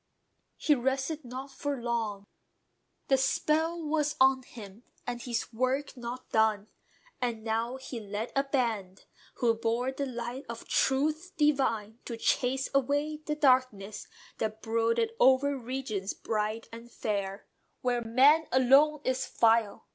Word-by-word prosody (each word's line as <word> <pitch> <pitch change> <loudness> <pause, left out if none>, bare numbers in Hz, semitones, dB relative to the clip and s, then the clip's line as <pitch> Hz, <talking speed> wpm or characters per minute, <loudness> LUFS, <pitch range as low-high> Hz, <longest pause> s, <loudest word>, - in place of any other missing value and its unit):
He 305 - +3
rested 270 +4 -1
not 260 +3 -7
for 280 0 -3
long: 225 -4 -2 0.8
The 270 - +4
spell 320 +5 +1
was 300 -1 0
on 265 0 +5
him, 215 -4 -12 0.2
and 240 -1 -4
his 235 -1 -3
work 255 +5 -1
not 245 +1 -7
done. 220 -1 +2 0.5
And 235 -3 -2
now 230 +2 -1
he 260 -2 -7
led 210 +1 -5
a 275 - +3
band, 230 -9 -2 0.3
who 235 -2 +2
bore 230 +3 -1
the 275 +1 -3
light 245 +2 -5
Of 235 0 -7
truth 305 +6 +1
divine, 260 -7 +1
to 235 - -5
chase 260 +3 +1
away 285 +3 +1
the 300 - 0
darkness 255 -8 +1 0.3
That 220 0 -3
brooded 230 - +1
over 270 +2 +5
regions 240 -6 -4
bright 215 +1 -2
and 230 +1 -10
fair, 200 -3 -3 0.4
Where 245 -1 0
"man 270 +8 +5
alone 275 +4 +5
is 260 0 -1
vile." 225 -2 +2
250 Hz, 135 wpm, -29 LUFS, 225-275 Hz, 0.8 s, on